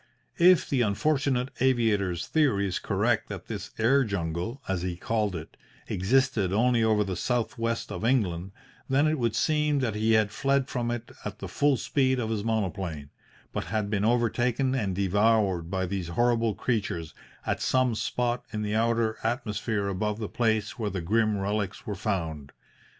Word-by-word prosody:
If 180 0 +6
the 135 -3 +1
unfortunate 130 +3 +1
aviator's 110 -9 +1
theory 135 -11 +2
is 90 - -2
correct - - 0
that - - -6
this 105 -2 -6
air 135 +5 +4
jungle, 90 - -3
as 95 -2 -1
he 90 -1 -2
called 105 0 -1
it, 80 -2 -8 0.3
existed 115 0 +1
only 115 +3 +3
over 110 -1 +3
the 95 -2 -3
south 120 +5 -1
west 115 0 -2
of - - -5
England, 95 -7 +1 0.4
then 135 +3 +3
it 155 -1 +1
would 115 -2 0
seem 150 -1 +2
that 115 -4 0
he 110 +2 +2
had 110 -1 +3
fled 135 +2 +1
from 120 -2 -2
it 120 -1 -4
at - - -5
the - - -6
full 145 -2 +2
speed 130 +5 +1
of 110 -2 -2
his 105 -2 -1
monoplane, 95 -9 -2 0.4
but - - -2
had 105 -2 -2
been 105 -2 0
overtaken 120 +3 +1
and 105 -8 -1
devoured 100 -2 +2
by 95 0 -1
these 95 -2 -3
horrible 115 +3 +1
creatures 100 -9 -2 0.3
at - - -1
some 130 -2 +2
spot 120 +3 -1
in 105 -2 -3
the 105 0 -2
outer 115 0 +1
atmosphere 110 -3 -1
above 105 +2 -1
the 110 -2 -4
place 110 +1 0
where 105 -2 -1
the 95 -2 -3
grim 110 +4 +1
relics 100 0 -2
were 105 - -3
found. 80 -7 -3
110 Hz, 170 wpm, -27 LUFS, 100-120 Hz, 0.4 s, If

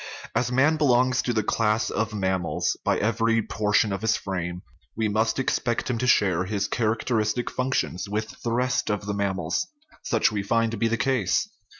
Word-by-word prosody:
As 120 0 0
man 145 +5 +3
belongs 130 -3 +3
to 125 - -1
the 110 -2 0
class 110 +1 +1
of 110 -1 -1
mammals 95 -4 -1
(see - - -5
p. - - -48
27) - - +1
by - - +3
every 115 0 +2
por 105 0 -2
tion 105 0 +3
of 100 - -4
his 110 0 +2
frame, 90 -2 -4 0.3
we 110 -1 +1
must 110 +2 +1
expect 125 -2 0
him 115 - -2
to 125 - 0
share 95 -6 +3
his 100 0 -1
characteristic 110 +1 0
functions 125 -7 -2
with 110 +1 -4
the 115 - -2
rest 125 +1 0
of 105 -1 -2
the 100 - -2
mammals. 95 -4 -1 0.3
Such 115 - +1
we 105 -2 -1
find 115 +3 +1
to 115 - -4
be 115 - +1
the 115 +1 0
case. 135 - +1
110 Hz, 205 wpm, -25 LUFS, 100-120 Hz, 0.3 s, man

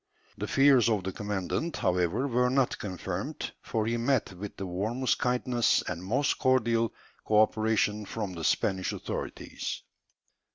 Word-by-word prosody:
The - - -4
fears 135 -4 +5
of 105 -4 +1
the 95 - -3
commandant, 105 - -2
however, 90 +8 +1
were 125 -1 +2
not 130 -1 +1
confirmed, 95 -4 -4
for 110 -1 -1
he 115 +1 0
met 120 -3 +1
with 100 +3 -8
the 95 - -4
warmest 110 +8 -1
kindness 125 -1 +2
and 85 0 -4
most 125 +9 +1
cordial 115 -4 +2 0.3
co 105 -1 +3
operation 110 -1 +2
from 105 -5 -4
the 85 -2 -6
Spanish 95 +3 +1
authorities. - - -5
110 Hz, 140 wpm, -29 LUFS, 95-125 Hz, 0.3 s, fears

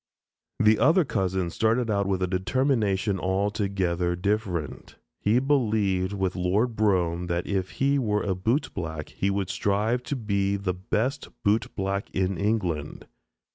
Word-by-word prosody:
The 110 0 +4
other 160 - +4
cousin 95 -6 -1
started 110 +3 +1
out 100 -1 +1
with 95 -1 0
a - - +1
determination 100 0 +1
altogether 95 -2 0
different. 95 -5 -2 0.2
He 105 +3 +2
believed 110 -9 +1
with 95 -2 -1
Lord 100 +7 +1
Brougham, 90 -5 +1
that 85 0 -1
if 95 -2 -1
he 140 +1 +2
were 105 -4 0
a 95 - 0
bootblack 90 - -2
he 100 - -1
would 100 -1 -1
strive 105 +5 0
to 145 - -2
be 100 -4 0
the 100 -2 -2
best 110 +9 -2 0.2
bootblack 100 -2 0
in 95 0 0
England. 95 -8 -1
100 Hz, 135 wpm, -26 LUFS, 95-110 Hz, 0.2 s, The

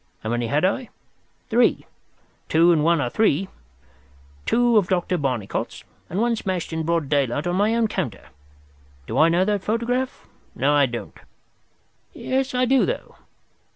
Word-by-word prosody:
How 110 - -3
many 120 0 -1
had 145 +8 +1
I? 240 +6 -1 0.6
Three—two 175 -7 0
and 155 -3 +3
one 170 0 +3
are 125 - -1
three—two 70 - -2
of 200 -4 +3
Dr. 180 0 0
Barnicot's, 125 -8 -3 0.3
and 185 - -2
one 235 +1 +2
smashed 185 -6 -3
in 160 - -1
broad 165 -2 0
daylight 140 -1 0
on 175 0 0
my 210 +4 +2
own 230 -1 +2
counter. 170 - -4 0.8
Do - - -2
I 160 - +6
know 175 +3 +2
that 205 -2 -1
photograph? 245 +4 -2 0.3
No, 140 +4 +2
I 145 -2 +4
don't. 120 -1 -7 0.9
Yes, 265 0 -2
I 250 0 +3
do, 265 +1 +3
though. - - -4
170 Hz, 150 wpm, -23 LUFS, 130-220 Hz, 0.9 s, I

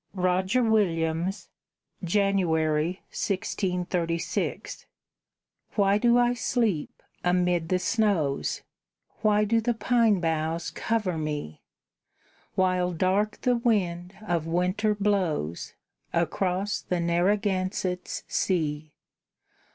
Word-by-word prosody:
ROGER 185 +6 +1
WILLIAMS 180 -4 0 0.6
[January, 175 -3 +1
1636] 180 -3 -2 0.9
Why 200 0 +3
do 240 +1 +4
I 245 0 +3
sleep 225 - -1 0.2
amid 180 -2 +1
the 185 - +3
snows, 195 -8 0 0.6
Why 210 -1 +3
do 225 +2 +2
the 240 +1 0
pine 230 -4 +3
boughs 165 0 -1
cover 210 -7 -1
me, 150 - -4 0.9
While 185 -1 +1
dark 190 +5 0
the 250 -1 +2
wind 190 -6 0
of 170 -5 -1
winter 185 +5 +1
blows 185 - -1 0.4
Across 185 +3 0
the 180 - -2
Narragansett's 185 +1 0
sea? 155 -4 -1
185 Hz, 90 wpm, -27 LUFS, 170-210 Hz, 0.9 s, do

